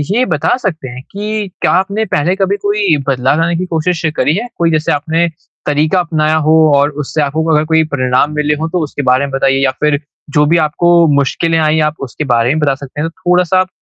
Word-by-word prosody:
ये 250 Hz, +2 st, +2 dB
बता 155 Hz, -, 0 dB
सकते 165 Hz, -, -4 dB
हैं 125 Hz, +1 st, -8 dB
कि 210 Hz, +1 st, -3 dB
क्या -, -, +2 dB
आपने 200 Hz, +4 st, 0 dB
पहले 175 Hz, +6 st, +1 dB
कभी 195 Hz, 0 st, 0 dB
कोई 205 Hz, -4 st, +1 dB
बदलाव 135 Hz, +2 st, +1 dB
लाने 170 Hz, +1 st, +1 dB
की 180 Hz, -, -2 dB
कोशिश 170 Hz, 0 st, -1 dB
करी 150 Hz, -, +1 dB
है? 230 Hz, +5 st, -3 dB
कोई 170 Hz, -1 st, +1 dB
जैसे 155 Hz, -1 st, 0 dB
आपने 165 Hz, +4 st, 0 dB, 0.4 s
तरीक़ा 155 Hz, +5 st, +1 dB
अपनाया 155 Hz, -3 st, 0 dB
हो 155 Hz, -, +4 dB, 0.2 s
और 140 Hz, +1 st, +3 dB
उससे 155 Hz, +3 st, -2 dB
आपको 150 Hz, +2 st, -1 dB
अगर 150 Hz, +1 st, +2 dB
कोई 160 Hz, 0 st, +2 dB
परिणाम 130 Hz, 0 st, 0 dB
मिले 150 Hz, 0 st, +1 dB
हों 160 Hz, -, -2 dB
तो 180 Hz, +1 st, -1 dB
उसके 145 Hz, -1 st, -4 dB
बारे 130 Hz, +2 st, +3 dB
में 140 Hz, -, -7 dB
बताइए 135 Hz, 0 st, +1 dB
या 135 Hz, -, +2 dB
फ़िर 150 Hz, -1 st, +2 dB, 0.4 s
जो 150 Hz, -, +4 dB
भी 165 Hz, +3 st, +3 dB
आपको 170 Hz, +3 st, 0 dB, 0.3 s
मुश्किलें 165 Hz, +4 st, 0 dB
आईं 155 Hz, 0 st, +2 dB
आप 150 Hz, 0 st, 0 dB
उसके 125 Hz, -, -5 dB
बारे 115 Hz, 0 st, +2 dB
में -, -, -1 dB
बता 145 Hz, -3 st, +1 dB
सकते 140 Hz, +1 st, -8 dB
हैं, 165 Hz, -, -1 dB
थोड़ा-सा 180 Hz, +1 st, +1 dB
आप 185 Hz, -, +1 dB
155 Hz, 220 wpm, -14 LUFS, 145-180 Hz, 0.4 s, हो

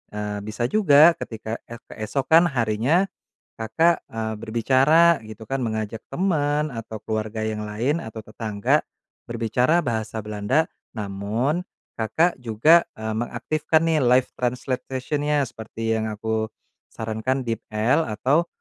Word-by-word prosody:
eee, 105 Hz, 0 st, -3 dB
bisa 110 Hz, +3 st, -4 dB
juga 155 Hz, -, +6 dB
ketika 110 Hz, 0 st, -5 dB
ek 115 Hz, 0 st, -9 dB
keesokan 140 Hz, +9 st, +3 dB
harinya, 125 Hz, -, +2 dB, 0.6 s
Kakak, 160 Hz, +10 st, +2 dB
eee, 110 Hz, -1 st, -3 dB
berbicara 135 Hz, +10 st, +4 dB
gitu 110 Hz, +1 st, -9 dB
kan 135 Hz, +3 st, -1 dB
mengajak 110 Hz, -2 st, -3 dB
teman 150 Hz, -3 st, +1 dB
atau 115 Hz, -1 st, -6 dB
keluarga 110 Hz, 0 st, -3 dB
yang 110 Hz, -1 st, -3 dB
lain 120 Hz, +10 st, 0 dB
atau 110 Hz, 0 st, -7 dB
tetangga, 105 Hz, -1 st, 0 dB, 0.5 s
berbicara 125 Hz, +8 st, +1 dB
bahasa 110 Hz, -1 st, -2 dB
Belanda 105 Hz, +9 st, +1 dB, 0.3 s
namun 105 Hz, -, -1 dB, 0.4 s
Kakak 135 Hz, +10 st, +1 dB
juga, 125 Hz, +9 st, +5 dB
eee, 110 Hz, 0 st, -3 dB
mengaktifkan 125 Hz, +8 st, 0 dB
nih 160 Hz, -2 st, +2 dB
live 125 Hz, 0 st, +4 dB
translation-nya 130 Hz, +4 st, -1 dB
seperti 115 Hz, -1 st, -4 dB
yang 110 Hz, -, -2 dB
aku 110 Hz, +1 st, -2 dB, 0.4 s
sarankan 110 Hz, +4 st, -2 dB
DeepL 115 Hz, +5 st, 0 dB
atau 140 Hz, +10 st, +1 dB
115 Hz, 120 wpm, -24 LUFS, 110-145 Hz, 0.6 s, juga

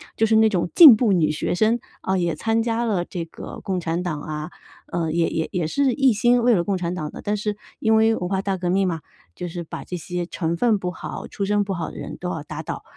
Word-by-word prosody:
就 -, -, 0 dB
是 220 Hz, -, +3 dB
那 220 Hz, 0 st, +6 dB
种 180 Hz, -5 st, 0 dB
进 305 Hz, -9 st, +11 dB
步 215 Hz, -1 st, +2 dB
女 155 Hz, -4 st, +2 dB
学 155 Hz, -, -2 dB
生， 225 Hz, +4 st, +2 dB, 0.2 s
啊 190 Hz, -, 0 dB
也 175 Hz, -2 st, 0 dB
参 225 Hz, 0 st, 0 dB
加 230 Hz, +1 st, 0 dB
了 200 Hz, -6 st, 0 dB
这 175 Hz, -2 st, -5 dB
个 165 Hz, -, -9 dB
共 190 Hz, -2 st, -1 dB
产 170 Hz, +1 st, -2 dB
党 155 Hz, -5 st, -3 dB
啊， 155 Hz, +2 st, -5 dB, 0.4 s
呃， 165 Hz, -2 st, -1 dB
也 165 Hz, 0 st, +1 dB
也 160 Hz, -, -2 dB
也 175 Hz, -4 st, -1 dB
是 265 Hz, -, +1 dB
一 270 Hz, -4 st, +3 dB
心 240 Hz, +3 st, +3 dB
为 245 Hz, -, +5 dB
了 175 Hz, -5 st, +2 dB
共 195 Hz, +1 st, -1 dB
产 175 Hz, -1 st, -2 dB
党 155 Hz, -4 st, -4 dB
的。 -, -, -9 dB
但 210 Hz, 0 st, 0 dB
是 210 Hz, 0 st, -3 dB, 0.2 s
因 220 Hz, 0 st, +3 dB
为 220 Hz, 0 st, +4 dB
文 180 Hz, -3 st, -3 dB
化 190 Hz, -1 st, 0 dB
大 195 Hz, -1 st, -1 dB
革 180 Hz, -1 st, -3 dB
命 190 Hz, +1 st, +2 dB
嘛， 165 Hz, -3 st, -2 dB, 0.3 s
就 180 Hz, -, -5 dB
是 175 Hz, 0 st, -5 dB
把 160 Hz, -, -7 dB
这 180 Hz, -, -5 dB
些 175 Hz, +1 st, -4 dB
成 170 Hz, -1 st, -2 dB
分 225 Hz, +3 st, +2 dB
不 180 Hz, -2 st, -3 dB
好、 -, -, -7 dB
出 200 Hz, -, -5 dB
身 205 Hz, +1 st, +2 dB
不 195 Hz, -1 st, -3 dB
好 170 Hz, -2 st, -3 dB
的 -, -, -11 dB
人 -, -, -7 dB
都 180 Hz, -, -4 dB
要 160 Hz, -5 st, -4 dB
打 155 Hz, +1 st, -6 dB
倒。 -, -, -6 dB
185 Hz, 285 characters per minute, -23 LUFS, 170-220 Hz, 0.4 s, 进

